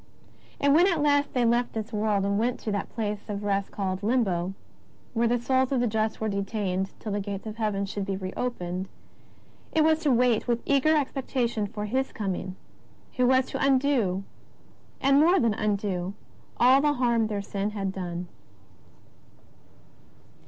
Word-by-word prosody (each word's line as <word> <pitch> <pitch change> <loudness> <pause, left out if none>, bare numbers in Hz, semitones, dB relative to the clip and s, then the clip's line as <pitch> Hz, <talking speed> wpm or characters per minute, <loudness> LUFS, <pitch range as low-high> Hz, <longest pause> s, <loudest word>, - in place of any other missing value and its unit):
And 280 0 +4
when 345 +5 +6
at 345 -5 +1
last 285 -1 +3
they 250 -2 +2
left 240 +1 +1
this 220 0 -4
w^orld 210 -2 +1
and 200 +1 +1
went 245 +2 0
to 215 - -3
that 200 -1 -2
place 210 -3 -3
of 205 0 -4
rest 200 -1 0
called 190 -2 -3
Limbo, 195 -6 0 0.6
where 235 0 +2
the 240 +1 +2
souls 260 +2 +1
of 265 - +2
the 245 - +2
just 220 -1 -1
were 220 - -1
detained 195 -2 -2
till 215 - -5
the 205 - -1
gates 200 0 -5
of 215 0 -6
Heaven 210 -3 -1
should 200 0 -4
be 195 - -1
re 185 -1 -5
opened, 185 -6 -3 0.8
it 315 - +3
was 315 0 +4
to 315 -3 0
wait 245 -2 +2
with 235 -1 0
eager 285 +3 +3
expectation 255 -6 -1
for 210 +1 -5
His 260 +5 -1
Coming 190 -2 -4 0.6
who 250 -1 +3
was 260 0 +4
to - - -2
undo 260 -9 +2 0.8
and 275 +1 +4
more 350 +5 +5
than 230 -6 +2
undo 200 -3 -2 0.4
all 260 +3 +6
the 295 0 +3
harm 235 -4 +2
their 205 -2 -3
sin 200 0 -2
had 200 -2 -3
done. 180 -2 -5
220 Hz, 175 wpm, -27 LUFS, 200-255 Hz, 0.8 s, when